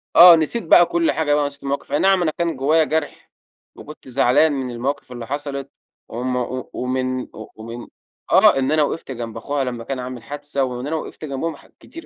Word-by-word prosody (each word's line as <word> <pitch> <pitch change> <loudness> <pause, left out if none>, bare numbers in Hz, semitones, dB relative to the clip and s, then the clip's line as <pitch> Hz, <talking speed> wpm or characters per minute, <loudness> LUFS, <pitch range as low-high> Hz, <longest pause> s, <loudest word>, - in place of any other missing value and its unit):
آه، 175 +1 +10
نسيت 165 +8 -1
بقى 175 +1 +6
كل 170 -1 +1
حاجة 145 0 0
بقى، 145 0 +2
ونسيت 140 0 -6
المواقف 140 0 -4
أي 145 - +1
نعم 195 -1 +3
أنا 160 -3 +1
كان 170 +1 -2
جوّايا 150 +5 +3
جرح، 155 -1 -3 0.4
وكنت 150 -2 -12
زعلان 130 +4 +3
من 130 -3 -3
المواقف 125 +2 -4
اللي 120 -2 -7
حصلِت، 140 0 -5 0.4
وم 125 +2 -3
و 125 0 -3
ومن 130 0 -2
ومن 115 +2 -9 0.4
آه - - +6
إن 135 +1 0
أنا 155 -1 +3
وقفت 145 -1 -4
جنب 115 -3 -6
أخوها 140 +4 -2
لمّا 120 -3 -4
كان 130 +2 -4
عامل 125 -2 -7
حادثة، 145 +2 -3
وإن 125 0 -4
أنا 160 - -2
وقفت 155 0 -6
جنبهم 150 +3 -3
ح - - -18
كتير 335 +1 -12
140 Hz, 200 wpm, -21 LUFS, 125-155 Hz, 0.4 s, آه